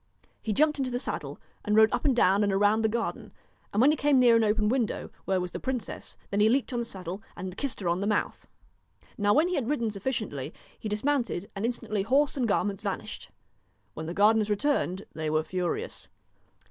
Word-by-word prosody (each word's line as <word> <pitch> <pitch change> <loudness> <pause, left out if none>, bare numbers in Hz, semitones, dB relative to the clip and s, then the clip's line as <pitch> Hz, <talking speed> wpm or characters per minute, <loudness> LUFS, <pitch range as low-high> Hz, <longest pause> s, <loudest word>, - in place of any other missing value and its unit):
He 220 - -2
jumped 300 +6 +2
into 265 -1 0
the 245 - -2
saddle 250 - -4 0.2
and 210 -1 +1
rode 220 0 +6
up - - -1
and 270 -3 +3
down 200 -2 +4
and 200 - +2
around 205 +3 +3
the 220 - +3
garden, 230 +1 -3 0.4
and 205 - -1
when 270 +5 +6
he - - +2
came 290 -2 +3
near 240 -2 +6
the 220 - +3
open 210 0 +2
window, 240 -1 -1
where 190 -1 +1
was 180 -1 -4
the - - -5
princess, 255 -4 -4
then 200 - 0
he 210 +1 +5
leaped 260 +2 +1
on 240 - 0
the 235 - -2
saddle, 190 -2 -6
and 185 0 -6
kissed 275 +3 -2
her 180 - -2
on 170 +1 +1
the 200 - -1
mouth. 210 -1 -1 0.7
Now 205 -1 +2
when 310 +4 +4
he 365 - -2
had 275 -7 -1
ridden 235 -7 0
sufficiently, 200 - -4 0.2
he 215 - -4
dismount 245 +4 0
ed, 175 +3 -5
and 200 +3 -2
instantly 215 -4 -2
horse 275 +8 +2
and 255 -4 0
garments 205 -1 0
vanished. 200 -3 -5 0.6
When 160 0 -6
the 170 - -5
gardeners 215 +1 +4
returned 205 -4 0
they 155 -1 -3
were 155 +1 +1
furious. 180 0 -3
215 Hz, 215 wpm, -28 LUFS, 195-250 Hz, 0.7 s, rode